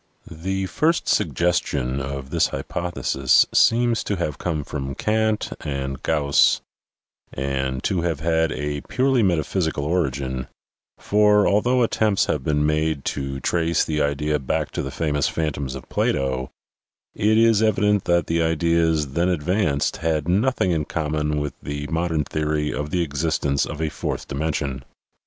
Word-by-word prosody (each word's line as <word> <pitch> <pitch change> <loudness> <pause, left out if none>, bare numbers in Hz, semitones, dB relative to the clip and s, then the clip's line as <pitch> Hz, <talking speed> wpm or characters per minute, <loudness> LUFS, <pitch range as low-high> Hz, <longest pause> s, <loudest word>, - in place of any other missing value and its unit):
The 95 +4 -3
first 160 - 0
suggestion 70 -6 0
of 70 0 -6
this - - +3
hypothesis 75 -6 +1
seems 120 0 +3
to 100 - -1
have 75 -5 -3
come 80 -4 -2
from 70 -2 -5
Kant 110 0 0
and 70 -2 -4
Gauss 70 -3 +3 0.7
and 65 -1 -2
to 95 -4 0
have 85 -4 -1
had 80 0 +1
a 75 0 -3
purely 130 -1 +2
meta 85 -6 +2
physical 80 -3 -1
origin, 70 -6 -1 0.5
for, 105 0 +3
although 120 +5 +3
attempts 110 -3 +2
have 75 - -1
been 75 0 +1
made 75 -1 0
to 70 -1 -4
trace 85 +1 +1
the 75 -1 -1
idea 75 +1 0
back 65 - -2
to - - -3
the 70 - -4
famous 75 -1 0
phantoms 70 -4 -2
of 65 - -9
Plato, 65 -1 -1 0.6
it 110 +2 +2
is 115 -2 +4
evident 105 -2 +2
that 85 -2 +2
the 85 0 0
ideas 80 -2 +1
then 85 +6 0
advanced 90 -3 0
had 80 -2 -1
nothing 100 +1 +2
in 80 -3 0
com 75 -2 -3
mon 75 -1 0
with 75 0 -3
the 75 0 -5
modern 80 -2 0
theory 75 0 -1
of 75 0 -3
the 90 0 0
existence 70 -2 0
of 80 - -6
a 80 -1 0
fourth - - -4
dimension. 70 -2 -2
80 Hz, 150 wpm, -23 LUFS, 70-90 Hz, 0.7 s, is